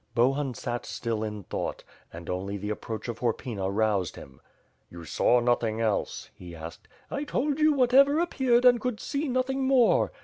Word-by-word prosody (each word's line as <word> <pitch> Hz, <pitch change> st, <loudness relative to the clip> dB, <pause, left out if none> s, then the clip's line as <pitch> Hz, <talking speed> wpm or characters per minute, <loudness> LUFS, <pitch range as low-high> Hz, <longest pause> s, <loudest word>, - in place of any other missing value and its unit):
Bohun 130 Hz, +2 st, +1 dB
sat 120 Hz, 0 st, -4 dB
still 115 Hz, -2 st, -3 dB
in 105 Hz, -2 st, -5 dB
thought, -, -, -4 dB, 0.3 s
and 85 Hz, 0 st, -10 dB
only 95 Hz, +2 st, -3 dB
the 105 Hz, +2 st, -4 dB
approach 110 Hz, +1 st, -5 dB
of 115 Hz, -1 st, -5 dB
Hor 120 Hz, -3 st, +1 dB
pyna 100 Hz, -7 st, -4 dB
roused 100 Hz, -3 st, 0 dB
him. 65 Hz, -1 st, -13 dB, 0.5 s
"You 85 Hz, -1 st, -10 dB
saw 120 Hz, +9 st, +3 dB
nothing 120 Hz, -2 st, +1 dB
else?" 110 Hz, -3 st, -2 dB
he 85 Hz, -1 st, -11 dB
asked. 80 Hz, +1 st, -10 dB, 0.2 s
"I 285 Hz, -, -2 dB
told 290 Hz, 0 st, -1 dB
you 310 Hz, 0 st, +5 dB
whatever 275 Hz, +2 st, +5 dB
appeared 255 Hz, -8 st, +2 dB
and 245 Hz, -2 st, +6 dB
could 250 Hz, -3 st, -2 dB
see 290 Hz, +2 st, -2 dB
nothing 260 Hz, +1 st, 0 dB
more. 260 Hz, -3 st, +4 dB
120 Hz, 175 wpm, -27 LUFS, -, 0.5 s, and